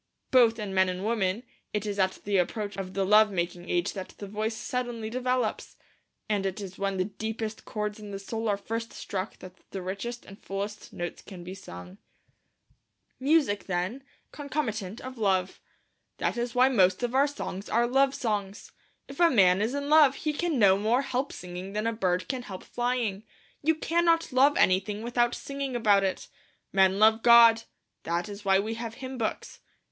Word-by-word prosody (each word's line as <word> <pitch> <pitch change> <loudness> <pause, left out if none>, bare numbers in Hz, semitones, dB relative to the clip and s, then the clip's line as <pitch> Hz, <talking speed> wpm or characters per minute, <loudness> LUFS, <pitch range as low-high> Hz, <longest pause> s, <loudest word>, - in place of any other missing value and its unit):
Both 235 -3 +5
in 210 -3 -5
men 190 -1 +3
and 185 +2 -4
women 215 -1 0 0.3
it 210 0 -1
is 205 -1 -3
at 190 0 0
the 200 -1 +1
approach 205 +3 -1
of 190 -1 -6
the 195 -1 +1
love 210 +2 +6
making 175 -1 -3
age 175 0 0
that 190 -1 -7
the 205 - -7
voice 215 +2 -3
suddenly 235 -2 -4
develops, 250 -2 -1 0.5
and 205 -2 0
it 195 +1 -3
is 195 -2 -8
when 195 -1 -1
the 185 - +1
deepest 220 +1 -5
chords 210 0 -4
in 210 -1 -9
the 200 - -5
soul 225 +3 -3
are 200 - +1
first 225 +3 -5
struck 190 +1 -5
that 185 -1 -11 0.2
the 195 - -5
richest 205 +6 -5
and 195 +1 -14
fullest 200 +2 -5
notes 175 0 -5
can 185 -3 -11
be 180 +2 -7
sung. 90 - -11 1.2
Music, 275 -7 +2
then, 180 +2 -1
is 265 - -10
the 275 - -32
natural - - -35
concomitant 230 -9 -4
of 255 -1 -8
Love. 190 -3 0 0.6
That - - -1
is 240 0 -3
why 250 +1 +6
most 190 -5 +3
of 245 0 -1
our 275 +2 +4
songs 205 -9 -6
are 235 +2 +3
love 270 +2 +2
songs. 205 -4 -3 0.4
If 275 +3 -11
a 340 -1 +6
man 190 - +4
is 230 +6 0
in 285 0 -3
love 295 -2 +6
he 305 +1 -2
can 330 -1 -1
no 195 -4 +5
more 230 +6 +2
help 265 +1 -2
singing 180 +2 -7
than 210 +1 -2
a 230 - +1
bird 185 -4 0
can 260 -2 -3
help 195 -6 -8
flying. 240 -5 -2 0.4
You 320 +2 +2
cannot 330 -1 +1
love 275 +3 +5
anything 200 +3 +2
without 240 0 +1
singing 275 -2 -5
about 205 -4 +4
it. 190 -1 -2 0.5
Men 190 0 +4
love 220 +2 +5
God; 230 -1 +7 0.4
that 170 +3 -2
is 205 0 -8
why 195 -1 +4
we 215 +3 -1
have 230 0 -6
hymn 260 -1 -7
books. 220 - -3
215 Hz, 195 wpm, -28 LUFS, 195-245 Hz, 1.2 s, God